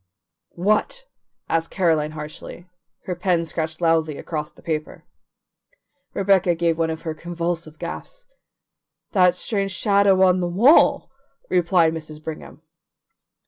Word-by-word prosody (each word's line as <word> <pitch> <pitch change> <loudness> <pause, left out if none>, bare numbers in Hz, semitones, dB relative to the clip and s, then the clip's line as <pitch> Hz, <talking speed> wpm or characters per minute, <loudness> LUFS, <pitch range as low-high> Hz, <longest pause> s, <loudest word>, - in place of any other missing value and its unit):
"What?" 215 - 0 0.4
asked 165 0 0
Caroline 160 -5 +1
harshly; 155 +3 -9 0.4
her 180 - -2
pen 175 -2 +1
scratched 160 0 -4
loudly 160 -3 +1
across 150 -2 -5
the - - -21
paper. 155 -2 -4 1.1
Rebecca 190 -3 +3
gave 165 0 +1
one 165 0 +1
of 160 0 -5
her 160 -2 -3
convulsive 170 -1 -4
gasps. - - -7 0.9
"That 180 -3 +4
strange 195 -1 -2
shadow 200 -1 +3
on 185 -1 +4
the 175 - -1
wall," 230 - +4 0.4
replied 170 -2 +3
Mrs. 155 -1 -8
Brigham. 160 0 -8
170 Hz, 120 wpm, -22 LUFS, 160-185 Hz, 1.1 s, That